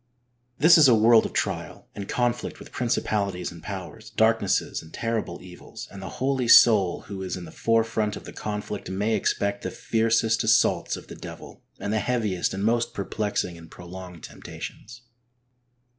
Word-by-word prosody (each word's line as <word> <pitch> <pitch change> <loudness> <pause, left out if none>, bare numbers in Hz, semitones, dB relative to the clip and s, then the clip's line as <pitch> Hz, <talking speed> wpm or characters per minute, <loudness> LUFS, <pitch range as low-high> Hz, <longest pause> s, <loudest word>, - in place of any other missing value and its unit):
This 165 +3 +7
is 150 - +8
a 120 - +6
world 110 +1 +5
of - - -14
trial, - - -3
and 100 -1 -7
conflict 120 -1 -1
with - - -13
principalities 100 -7 -1
and 85 -1 -12
powers, 100 +4 -8
darknesses 110 -3 +1
and 80 - -15
terrible 115 -7 -3
evils, 90 -1 -10
and 100 - -9
the 95 - -6
holy 130 -2 0
soul 105 -6 +6
who 95 -1 -8
is 95 -1 -4
in 90 - -8
the - - -11
fore 115 0 +2
front 110 -2 -2
of - - -9
the - - -10
conflict 105 -1 -5
may 100 +4 0
expect 100 -1 0
the - - -3
fiercest 115 0 +1
assaults 110 0 +2
of - - -11
the - - -9
devil, - - -10 0.2
and 100 - -3
the 110 - +2
heaviest 105 -5 -1
and 95 +2 -2
most 115 +1 +1
perplexing 100 -3 -2
and 80 -1 -13
prolonged 90 -1 -10
temptations. 120 +3 -9
105 Hz, 175 wpm, -25 LUFS, 95-115 Hz, 0.2 s, is